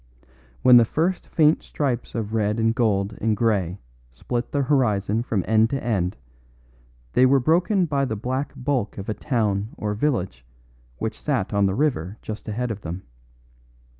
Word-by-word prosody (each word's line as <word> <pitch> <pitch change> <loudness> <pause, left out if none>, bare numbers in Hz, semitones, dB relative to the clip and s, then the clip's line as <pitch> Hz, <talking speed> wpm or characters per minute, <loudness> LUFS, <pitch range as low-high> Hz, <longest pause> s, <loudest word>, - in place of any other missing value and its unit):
When 125 -1 +8
the 120 - +7
first 165 +10 -1
faint 155 -1 +3
stripes 130 -6 -3
of 110 -2 -3
red 105 0 0
and 115 0 +2
gold 105 -3 0
and 110 -1 +1
grey 100 -6 +1 0.3
split 120 - -4
the 140 -1 +1
horizon 110 -6 +1
from 110 -6 -2
end 110 0 +4
to 135 +1 -3
end 95 - -1 1.0
they 125 - +4
were 135 +1 +4
broken 175 - +2
by 140 -3 0
the 110 - -3
black 130 +6 -3
bulk 125 -5 -2
of 100 +1 -6
a - - 0
town 105 -5 -1
or 105 -1 -2
village 105 - -1 0.5
which 110 - -4
sat 125 -10 -1
on 100 -1 +3
the 95 - -1
river 110 - -1
just 110 0 -7
ahead 115 +3 -2
of 105 -1 -6
them. 85 +2 -6
115 Hz, 165 wpm, -23 LUFS, 100-130 Hz, 1.0 s, When